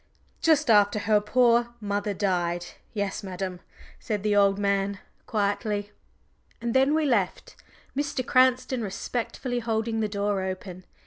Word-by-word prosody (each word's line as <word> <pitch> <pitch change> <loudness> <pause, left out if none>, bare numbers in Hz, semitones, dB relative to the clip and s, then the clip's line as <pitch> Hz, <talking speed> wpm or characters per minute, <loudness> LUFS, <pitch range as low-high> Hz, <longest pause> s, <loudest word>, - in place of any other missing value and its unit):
"Just 310 -5 +4
after 205 -1 +5
her 210 +1 +2
poor 240 +1 +3
mother 205 -1 -2
died 175 -3 0 0.3
yes, 200 -2 -2
madam," 185 -2 -5 0.4
said 210 -2 -3
the 210 -1 +2
old 200 -1 +4
man 200 0 0 0.3
quietly. 205 0 -1 0.7
And 235 -1 -2
then 270 +3 +4
we 315 -1 +2
left, 210 -9 0 0.4
Mr. 280 -2 -2
Cranston 255 -1 +3
respectfully 240 +4 -3
holding 225 -1 -1
the 215 - +1
door 200 -1 -1
open. 185 -1 -6
210 Hz, 130 wpm, -26 LUFS, 200-240 Hz, 0.7 s, after